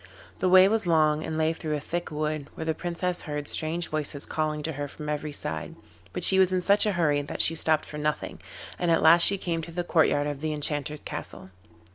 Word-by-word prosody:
The 185 - +1
way 185 +1 +7
was 220 -2 0
long, 155 -2 +2
and 160 - -4
lay 160 0 +1
through 155 -1 -4
a - - -3
thick 170 +4 -5
wood, 150 -1 -3
where 160 - -6
the 160 - 0
Princess 175 +2 -3
heard 150 -2 -5
strange 165 +2 -1
voices 150 -2 -4
calling 155 -1 -3
to 160 - -1
her 145 -1 -5
from 150 +1 -9
every 150 0 -3
side, 80 - -5 0.4
but - - -4
she 190 - +6
was 190 -1 +4
in 185 - +1
such 200 +4 +3
a 210 - 0
hurry 150 -5 +1
that 145 - -7
she - - +4
stopped 160 -1 0
for 150 - -8
nothing, 150 0 -3 0.4
and 175 - -1
at 165 - +2
last 170 +2 +7
she 200 +3 +9
came 170 -3 -3
to 170 - -9
the 175 +1 -3
courtyard 155 -4 +1
of 145 -1 -5
the 155 0 -2
Enchanter's 150 0 -3
castle. 95 - -8
155 Hz, 230 wpm, -26 LUFS, 150-175 Hz, 0.4 s, she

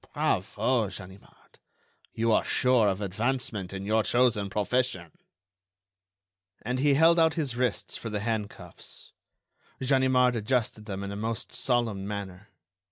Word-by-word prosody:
Bravo, 120 -5 0
Ganimard, 95 +1 -13 0.5
you 115 +1 0
are - - +3
sure 125 -4 +3
of 95 0 -1
advancement 105 -1 -2
in 95 0 -6
your 110 +2 +2
chosen 115 -4 +2
profession!" 105 -5 -1 1.5
And 125 +3 -2
he 140 +1 +3
held 165 +3 +5
out 160 -1 +3
his 145 -7 -2
wrists 125 0 -1
for 115 - -6
the 105 -1 -3
hand 110 -2 -1
cuffs. - - -12 0.7
Ganimard 130 -2 +3
adjusted 110 -1 -1
them 100 -2 -5
in 100 - -5
a - - -5
most 110 +2 -4
solemn 115 -6 0
manner. 100 -1 -6
110 Hz, 135 wpm, -28 LUFS, 100-125 Hz, 1.5 s, held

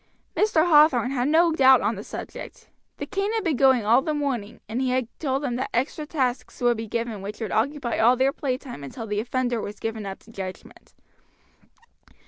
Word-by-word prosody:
Mr. 360 -7 +3
Hathorn 295 -6 +5
had 255 -1 0
no 330 +2 +4
doubt 265 -4 +6
on 210 +3 +1
the 205 -1 -7
subject. - - -9 0.3
The - - -4
cane 400 +1 -2
had 445 -2 -1
been 330 -6 +1
going 260 -4 +4
all 235 +5 +5
the 305 +1 -2
morning, 255 -8 -3
and 225 +4 -2
he 260 - 0
had 255 -2 0
told 275 -2 -1
them 245 -3 -2
that 265 - -3
extra 295 +5 -1
tasks 255 -5 -2
would 240 -1 +2
be 225 0 -5
given 230 -2 -3
which 205 +2 -7
would 220 - -4
occupy 255 +2 -1
all 240 +3 +5
their 265 +2 +2
playtime 255 - -4
until 225 - -7
the 210 -1 -2
offender 245 0 -1
was 205 +1 -7
given 220 -2 -4
up 195 - -6
to 225 - -17
judgment. 190 -3 -9
250 Hz, 200 wpm, -24 LUFS, 225-280 Hz, 0.3 s, doubt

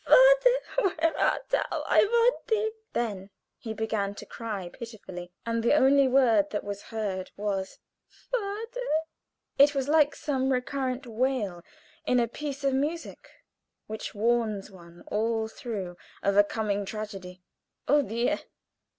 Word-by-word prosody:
father! - - +5
where 325 +1 +1
art - - +1
thou? - - 0
I - - +4
want 470 +3 +3
thee!" 440 -1 +1 0.2
Then 205 -5 -2 0.3
he 225 - -6
began 215 -2 -2
to 210 - -9
cry 210 -5 -5
pitifully, 185 -6 -9
and 230 0 0
the 235 +5 +4
only 275 -1 +5
word 235 -6 +4
that 210 - -3
was 205 0 -5
heard 200 -4 -3
was 195 -2 -2 0.3
"Father!" 460 +2 -4 0.7
It 285 +1 +7
was 270 -1 0
like 300 -1 +4
some 270 -3 -1
recurrent 260 0 -1
wail 230 -6 -1 0.4
in 250 - +2
a 235 - +2
piece 280 +3 -6
of 275 -1 +2
music, 300 +5 -3 0.6
which 220 0 -6
warns 215 -2 0
one 170 -2 -15
all 220 +1 0
through 205 -6 -5 0.3
of 200 0 +2
a 205 - +8
coming 205 -1 -1
tragedy. 195 -3 -7 0.4
"Oh, 290 +2 +5
dear! 235 -1 0
235 Hz, 140 wpm, -28 LUFS, 205-285 Hz, 0.7 s, a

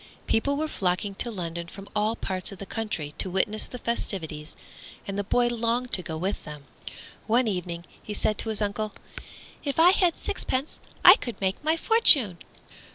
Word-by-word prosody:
People 280 +5 +1
were 310 +1 0
flocking 195 -4 -1
to 235 - -1
London 170 -5 -5
from 195 +3 -11
all 210 +2 +1
parts 190 -3 -4
of 195 - -9
the 200 - -7
country, 195 -10 -4
to 190 - -2
witness 205 +4 0
the 250 - -8
festivities, 165 -10 -4 0.5
and 195 - -4
the 205 - -1
boy 240 +4 +2
longed 240 +1 -1
to 185 - +2
go 160 -2 -4
with 190 +5 -2
them. 150 -1 -9 0.6
One 235 +2 +3
evening 175 -3 -3 0.2
he 210 - -6
said 215 0 0
to 225 - 0
his 215 -1 -1
uncle, 210 +1 -3 0.7
"If 285 +2 -1
I 345 +2 +8
had 360 -3 +2
sixpence 265 +4 -3 0.3
I - - +11
could 240 -4 -5
make 190 +7 -1
my 315 +2 +2
fortune." 285 - +5
210 Hz, 180 wpm, -26 LUFS, 185-240 Hz, 0.7 s, I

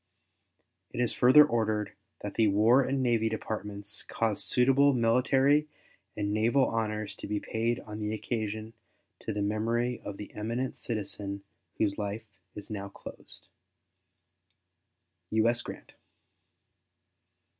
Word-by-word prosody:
It - - -7
is 120 -2 +1
further 130 +5 +7
ordered 110 -5 -1 0.3
that - - -5
the 110 - +3
War 110 +6 +5
and 135 0 0
Navy 115 -2 +2
Departments 105 -1 -4
cause 110 -2 -1
suitable 135 +3 +4
military 135 +5 +3 0.5
and 100 0 -1
naval 115 +5 +3
honors 110 -2 -2
to - - -7
be 105 0 -1
paid 115 +3 -1
on 105 0 -8
the 105 0 -2
occasion 110 0 -3 0.5
to - - -4
the 105 -1 -1
memory 115 +4 0
of 100 -1 -6
the 105 - -9
eminent 115 +5 -3
citizen 100 -3 -4 0.3
whose 105 -1 0
life 105 +2 -3 0.3
is 105 - -9
now 100 -1 -4
closed. - - -12 1.8
U.S. 115 +2 +2
GRANT. - - -9
110 Hz, 125 wpm, -29 LUFS, 105-120 Hz, 1.8 s, further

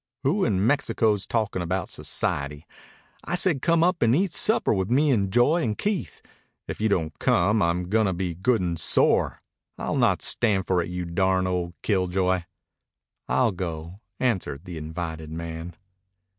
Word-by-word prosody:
"Who 175 +9 +1
in 100 -2 +1
Mexico's 110 -6 +1
talkin' 110 -5 -1
about 90 +2 -2
society? 70 +2 -2 0.6
I 180 - -2
said 175 -6 +2
come 165 -1 +3
up 180 0 +1
and 115 +1 +4
eat 185 +1 +1
supper 220 - +3
with 95 -1 -1
me 140 +4 +3
and 100 -6 +1
Joy 140 - +3
and 110 -8 -1
Keith. 205 -2 -3 0.4
If - - -6
you 110 - +2
don't 80 -6 -1
come, 105 +5 +2
I'm 85 +1 0
goin' 110 +2 +2
to 95 - 0
be 90 -1 -3
good 110 +7 +1
and 85 -2 -2
sore. - - +2 0.3
I'll - - -3
not - - +2
stand 100 -5 +2
for 90 -2 +1
it, 85 - -5
you 90 0 -4
darned 95 +2 +1
old 90 -1 -2
killjoy." 95 -2 0 0.8
"I'll 125 -3 +2
go," 85 0 -6 0.2
answered 95 - -1
the 90 - -7
invited 80 0 -6
man. 80 +1 -6
95 Hz, 165 wpm, -25 LUFS, 85-115 Hz, 0.8 s, and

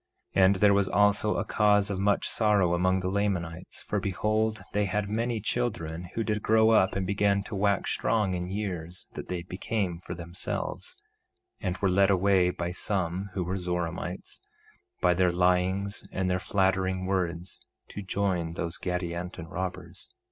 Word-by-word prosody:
1:29 95 - +5
And 95 +1 +5
there 100 +1 +5
was 100 -1 +2
also 105 +1 +3
a - - -1
cause 105 -1 +3
of 95 - -2
much 100 +1 +2
sorrow 105 -5 +3
among 95 +2 +2
the 90 - -2
Lamanites; 90 -4 -2
for 105 - -1
behold, 110 +3 0
they 105 0 +2
had 100 +1 -1
many 115 +1 0
children 95 -8 -2
who 115 - 0
did 105 -1 -1
grow 110 +1 +4
up 95 -4 +4
and 95 -1 -1
began 100 +1 +2
to 105 - -9
wax 100 0 +1
strong 105 -4 +1
in 90 0 -3
years, 95 -4 -4
that - - -7
they 90 -2 -3
became 90 -1 -2
for - - -7
themselves, 85 +1 -5 0.6
and 90 -1 -2
were 100 - +1
led 95 +1 +4
away 95 -1 +4
by 85 -1 -3
some 95 0 -2
who 95 - 0
were 95 +2 -2
Zoramites, 90 0 -4 0.6
by 90 - +4
their 90 0 +3
lyings 90 +3 +1
and 95 -1 -1
their 90 - +1
flattering 95 -1 +1
words, 90 -2 -2 0.3
to 105 - -6
join 95 -4 -1
those 85 -1 -4
Gadianton 90 -1 -4
robbers. 90 -1 -5
95 Hz, 165 wpm, -28 LUFS, 90-100 Hz, 0.6 s, 1:29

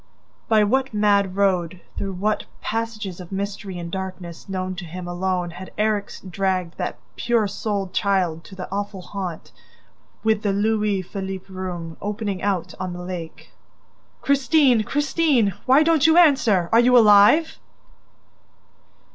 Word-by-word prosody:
By 220 -2 +5
what 260 +3 0
mad 200 -2 +2
road, 185 -3 +1 0.2
through 195 -1 -4
what 210 +4 -1
passages 215 -5 -4
of 180 0 -10
mystery 195 -1 -4
and 170 -1 -6
darkness 185 -2 -7
known 185 -1 -3
to 175 - -6
him 175 +2 -7
alone 180 0 -2
had 185 +2 -10
Erik 210 -1 0 0.2
dragged 185 -2 -2
that - - -3 0.2
pure 235 -3 +1
souled 195 -2 -3
child 185 -6 0
to 190 - -12
the 185 - -6
awful 200 -1 -4
haunt, 180 -3 -6 0.7
with 220 -1 +2
the 205 -2 0
Louis 210 -1 +1
Philippe 190 0 -6
room, 175 -3 -6
opening 205 -2 -3
out 185 -3 -1
on 185 -1 -4
the 180 0 -7
lake? 175 -3 -8 0.7
"Christine! 275 -3 +3
Christine!... 275 - +1
Why 270 +4 +6
don't 320 -1 +4
you 320 +1 +5
answer?... 260 - +4
Are 225 - +6
you 250 +1 +5
alive? 220 +9 +6
200 Hz, 140 wpm, -22 LUFS, 185-220 Hz, 0.7 s, Why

